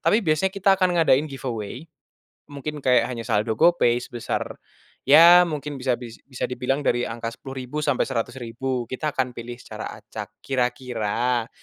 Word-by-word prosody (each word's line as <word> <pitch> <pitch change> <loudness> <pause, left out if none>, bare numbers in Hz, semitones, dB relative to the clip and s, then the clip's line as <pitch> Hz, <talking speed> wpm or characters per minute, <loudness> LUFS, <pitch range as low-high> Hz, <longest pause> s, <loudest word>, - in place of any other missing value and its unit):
tapi 215 - +4
biasanya 155 +4 +2
kita 195 0 +3
akan 180 -1 +2
ngadain 155 -2 +4
giveaway, 125 -1 -5 0.7
mungkin 145 +1 -5
kayak 125 -2 +4
hanya 115 -2 -5
saldo 110 0 0
GoPay 120 -8 +4
sebesar, 120 -1 -4 0.5
ya 170 +4 +9
mungkin 150 -2 -4
bisa 125 -1 +1
dis 115 -2 -10
bisa 130 - -4
dibilang 125 +3 -1
dari 120 0 +2
angka 115 0 -4
10.000 130 +3 -7
sampai 145 -3 +2
100.000 120 +1 -3
kita 150 +4 -2
akan 130 -1 0
pilih 120 +1 -7
secara - - -7
acak, - - -8 0.2
kira-kira 125 -2 -1
130 Hz, 150 wpm, -24 LUFS, 120-150 Hz, 0.7 s, ya